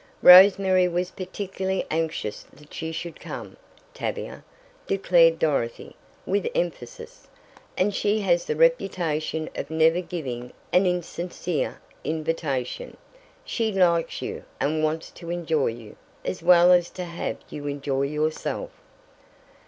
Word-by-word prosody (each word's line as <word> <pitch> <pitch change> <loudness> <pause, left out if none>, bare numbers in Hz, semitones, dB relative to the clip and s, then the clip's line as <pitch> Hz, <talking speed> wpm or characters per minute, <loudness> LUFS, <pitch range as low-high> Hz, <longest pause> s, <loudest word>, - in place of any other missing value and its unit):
"Rose 185 +2 +10
Mary 185 -2 +3
was 180 +1 -2
particularly 190 0 -3
anxious 160 -9 -2
that 150 +2 -11
you 160 0 -3
should 170 +1 -6
come, - - -8 0.4
Tavia," - - -5 0.4
declared 170 -4 +4
Dorothy, 140 -8 -1 0.3
with 200 +1 0
emphasis, 155 -9 -4 0.5
"and 200 +2 +2
she 210 +2 +1
has 175 -3 +2
the - - -2
reputation 165 - +1
of - - -5
never 160 +2 +3
giving 130 -9 -6 0.2
an 185 +1 +5
insincere 175 -2 -3 0.2
invitation. 155 -5 -3 0.5
She 225 -2 -1
likes 175 -4 +1
you, - - -5 0.2
and 155 +2 0
wants 155 +1 -1
to 170 -1 -10
enjoy 165 -4 0
you, 115 -2 -7 0.3
as 90 - -3
well 175 +1 +6
as 175 -1 +4
to 185 - -6
have 170 0 -4
you 145 0 -6
enjoy 140 -1 -2
yourself." 155 - -2
170 Hz, 125 wpm, -25 LUFS, 155-185 Hz, 0.5 s, Rose